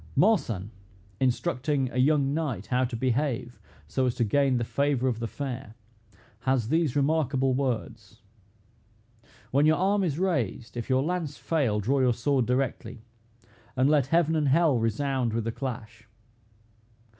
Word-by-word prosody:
Marsan, 115 - +2 0.5
instructing 135 0 0
a 125 - -5
young 140 0 +3
knight 140 - -2
how 125 0 +1
to 125 -1 -3
behave 125 0 -1 0.3
so 130 -1 0
as 120 - -1
to - - +1
gain 135 +3 +2
the 120 - -1
favor 140 +1 0
of 120 -3 -1
the 115 - -3
fair, 130 -4 -6 0.6
has 130 -3 0
these 160 -3 +1
remarkable 140 -3 +1
words: 115 -6 -4 1.3
"When 140 +3 +3
your 155 - +4
arm 195 +2 +2
is 155 -5 -1
raised, 125 - -2
if 120 +1 -5
your 130 0 +2
lance 165 -3 -3
fail, 135 -11 0
draw 130 +7 +1
your 125 -2 +3
sword 130 0 +1
directly; 125 -3 -2 0.7
and 130 +1 +3
let 145 -4 +3
heaven 165 +1 +2
and 150 -2 +1
hell 145 -2 +3
resound 120 +1 -1
with 115 0 -1
the 115 - -2
clash. 115 -3 -7
130 Hz, 150 wpm, -27 LUFS, 120-145 Hz, 1.3 s, your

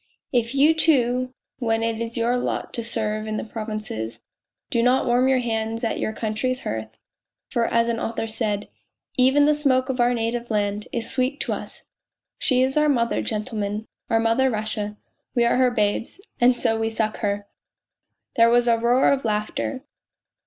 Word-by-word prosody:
' - - -53
If 230 +4 -7
you, 295 +4 +5
too, 255 -6 +2 0.3
when 225 -2 0
it 225 -1 -1
is 230 0 -3
your 235 +2 +2
lot 245 - -2
to 235 - -3
serve 215 -1 -2
in 215 0 -2
the - - -3
provinces, 215 - -5 0.5
do 235 - +2
not 250 +2 +3
warm 245 +1 +3
your 265 -1 +4
hands 225 -1 -2
at 230 - -1
your - - -1
country's 225 +4 -2
hearth... 110 0 -5 0.5
For 235 -1 +1
as 230 0 +2
an 230 -1 -1
author 225 0 -2
said: 220 -2 -2 0.3
' - - -38
Even 290 +2 +4
the 300 - +5
smoke 270 -3 +2
of 260 -1 -2
our 245 0 +3
native 235 +1 -2
land 205 -1 -1
is 235 -1 -3
sweet 260 +2 0
to - - 0
us.' - - -8 0.6
She 255 -1 +3
is 265 +2 0
our 300 0 +4
Mother, 235 -4 +1
gentlemen, 215 -1 -3 0.2
our 225 -1 +3
Mother 230 +4 +3
Russia; 215 -2 -3 0.4
we 240 -1 +4
are 235 - +3
her 255 -1 +4
babes, 215 - -1 0.2
and 245 0 +5
so 225 -1 +1
we 225 0 0
suck 220 -1 -1
her! 205 -1 -2 0.4
" - - -56
There 230 0 +6
was 240 +1 +3
a 230 -1 +4
roar 240 +3 +4
of 275 -1 +1
laughter. 215 +4 -2
230 Hz, 190 wpm, -23 LUFS, 220-250 Hz, 0.6 s, There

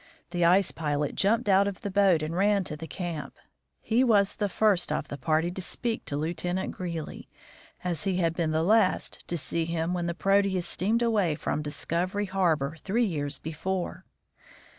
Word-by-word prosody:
The 175 -1 0
ice 180 +2 +4
pilot 150 -2 -1
jumped 220 +4 +2
out 195 0 +5
of 200 -2 -5
the 200 - -4
boat 190 -5 +4
and 155 +2 -3
ran 200 +1 +3
to 150 - -5
the 160 +2 -8
camp. 170 -3 -5 0.5
He 235 +4 +2
was 205 -5 +4
the 205 -1 -1
first 195 -5 +2
of 150 -1 -2
the 140 - -5
party 160 +5 +1
to 190 - -6
speak 230 +5 -3
to 145 - -3
Lieutenant 175 +4 -2
Greely, 170 -4 -6 0.5
as 170 -4 -2
he 190 -2 +1
had 165 -3 +1
been 165 -1 -1
the 160 +1 +1
last 210 +1 +2
to 175 - -2
see 165 +2 -1
him 165 +1 -1
when 175 -1 -1
the 170 - -2
Proteus 195 -2 +2
steamed 225 +6 0
away 205 -9 +2
from 150 - -2
Discov 170 +5 -2
ery 205 0 0
harbor 165 -6 0
three 230 +5 +1
years 145 -7 -2
before. 175 +4 -4
175 Hz, 185 wpm, -28 LUFS, 160-200 Hz, 0.5 s, out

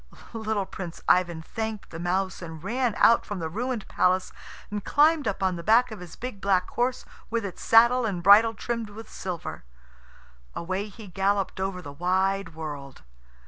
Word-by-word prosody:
Little 220 -3 -1
Prince 180 -3 -8
Ivan 175 -3 +3
thanked 220 +2 -5
the 165 - -7
mouse, 185 +2 -1
and 160 -2 -8
ran 240 +2 0
out 230 - +5
from 205 - -5
the 165 -2 -3
ruined 235 +4 -3
palace, 185 +1 +1 0.4
and 205 -1 -3
climbed 300 -1 +3
up 195 -1 -2
on 185 -2 +1
the 170 - -7
back 230 +4 +4
of 215 - -7
his 180 -2 -10
big 245 -5 -7
black 185 -2 +2
horse, 245 +1 -1 0.2
with 230 -2 -1
its 185 - -7
saddle 235 +2 +5
and 190 -6 -2
bridle 220 +4 +7
trimmed 230 +1 -3
with 220 +2 -11
silver. 180 -4 -5 0.9
Away 185 +4 -3
he 215 +2 -12
galloped 195 +1 0
over 190 -1 -3
the 145 -1 -8
wide 185 +2 0
world. 145 -4 -7
195 Hz, 175 wpm, -26 LUFS, 180-225 Hz, 0.9 s, bridle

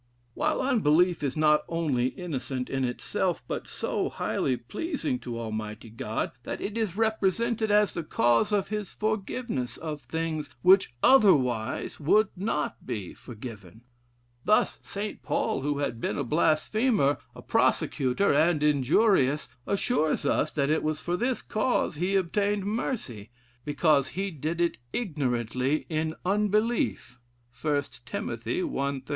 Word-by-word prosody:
While - - 0
unbelief 180 - +3
is 140 0 -2
not 150 -1 +4
only 150 -7 +1
innocent 130 -6 -4
in 135 0 0
itself, 125 -1 -1
but - - -4
so - - -2
highly 130 -2 -1
pleasing 150 - -3
to 120 -2 -5
Almighty 110 0 -5
God, 110 -1 -3
that - - -5
it 210 - -4
is 215 -5 -2
represented 220 +1 +1
as 210 -1 +4
the 170 - -2
cause 120 - +2
of 200 -2 +1
his 210 -2 -3
forgiveness 215 - -2
of 155 -2 -5
things 155 +3 -3
which 185 -8 +5
otherwise 130 - +3
would 205 +8 +4
not 185 -5 -2
be 100 -5 -5
forgiven. 110 -4 -10 0.6
Thus 215 - +2
St. 205 +1 -5
Paul, - - -1
who 145 +1 -1
had 120 -5 -2
been - - -1
a 140 - 0
blasphemer, 155 - +2 0.2
a - - -11
persecutor, 135 +9 +2
and 155 +1 +3
injurious, 150 - +3 0.2
assures 200 -5 +1
us 155 - +2
that 140 -1 +1
it 155 - +2
was 155 -1 -1
for 175 - -2
this 245 +6 -1
cause 215 -2 0
he 180 +5 0
obtained 200 +2 +1
mercy, 200 - -3 0.3
'because 145 -1 +2
he 195 0 -1
did 160 +2 -3
it 170 - 0
ignorantly 130 - -1
in 160 0 -1
unbelief.' 210 - 0 0.4
1 145 -2 +1 0.2
Tim. - - -3
i. - - -3
13. 140 - -2
155 Hz, 140 wpm, -27 LUFS, 130-205 Hz, 0.6 s, which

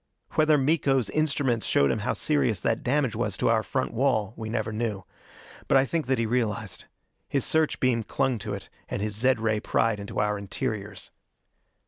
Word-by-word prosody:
Whether 155 -1 +4
Miko's 135 -6 +2
instruments 140 -6 0
showed 70 -1 +3
him - - -1
how - - -1
serious 70 -3 +1
that - - 0
damage 135 -2 +1
was 105 -4 -1
to - - +1
our 115 -1 +3
front 130 +3 -2
wall, 115 -4 +1
we 110 -1 -6
never 110 -1 -2
knew. 105 -3 -2 0.6
But - - +5
I 135 - +4
think 160 -1 -2
that 130 0 +2
he 115 - 0
realized. 110 -3 -2 0.4
His 135 -3 0
search 160 -1 +1
beam 125 -3 +2
clung 120 +2 -1
to 100 0 -4
it, 100 - -9 0.2
and 100 - -2
his 105 -1 -2
zed 125 +2 +2
ray 110 -1 +1
pried 110 0 +1
into 100 - -5
our 105 -1 0
interiors. 100 0 -5
115 Hz, 185 wpm, -26 LUFS, 105-135 Hz, 0.6 s, But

